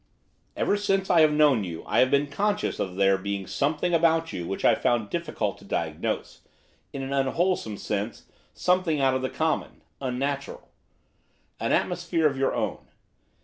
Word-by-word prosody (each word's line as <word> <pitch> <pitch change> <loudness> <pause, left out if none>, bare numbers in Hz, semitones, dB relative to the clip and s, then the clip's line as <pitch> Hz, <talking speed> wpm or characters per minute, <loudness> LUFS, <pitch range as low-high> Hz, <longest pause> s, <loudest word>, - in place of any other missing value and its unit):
'Ever 205 - +1
since 195 -1 0
I 170 -2 +6
have 155 -1 +6
known 150 -7 +4
you 85 -3 -6
I - - +1
have 130 - +5
been 140 +1 +3
conscious 205 +9 -1
of 95 -2 -3
there 95 0 +3
being 100 0 -3
something 150 - -1
about 165 0 +2
you 85 -2 -4
which 95 - -3
I - - +7
found 120 -2 +1
it 105 - -14
difficult 115 - -2
to - - -16
diagnose; 80 -5 -3 0.5
in 135 - -5
an 135 +1 -4
unwholesome 140 - 0
sense, 105 +2 -4 0.3
something 180 -4 +1
out 135 -1 +3
of 130 - 0
the 130 - -1
common, 160 -1 -2 0.2
non 125 -2 -2
natural; 140 +1 -4 0.9
an - - -1
atmosphere 175 -2 0
of 145 -2 +3
your 135 0 0
own. - - -2
140 Hz, 175 wpm, -26 LUFS, 105-165 Hz, 0.9 s, I